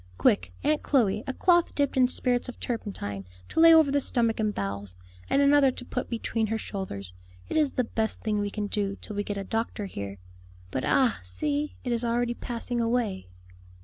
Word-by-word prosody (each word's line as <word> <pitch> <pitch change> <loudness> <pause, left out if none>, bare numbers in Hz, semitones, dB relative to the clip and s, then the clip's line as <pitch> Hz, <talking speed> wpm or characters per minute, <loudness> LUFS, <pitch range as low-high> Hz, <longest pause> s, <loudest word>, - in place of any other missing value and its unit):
Quick, 90 0 +2
Aunt 305 0 +2
Chloe! 215 -6 +2
a 265 - -1
cloth 345 -2 +3
dipped 285 -2 +1
in 255 -1 +5
spirits 250 -1 -1
of 250 - -9
turpentine, 105 - -4 0.2
to - - -1
lay 330 0 +9
over 320 -3 +6
the 285 0 +2
stomach 230 -3 +1
and 215 -1 +1
bowels, 100 - -3 0.3
and 280 - +4
another 280 -1 +6
to 250 -1 -7
put 250 - -4
between 225 -1 -1
her 225 +1 -1
shoulders. 100 - -5 0.4
It - - -3
is 300 -3 +2
the 250 - +1
best 220 -1 -2
thing 215 -1 0
we 205 0 -1
can 210 0 -3
do 200 -1 -1
till 210 - -7
we 205 - -1
get 205 0 -4
a 200 - -3
doctor 225 0 -2
here. 100 - -6 0.5
But, 130 - -2
ah, 255 -4 +3
see! 285 - -2
it 245 - -2
is 235 0 +1
already 240 0 +1
passing 240 0 -3
away." 230 - 0
230 Hz, 200 wpm, -27 LUFS, 200-255 Hz, 0.5 s, lay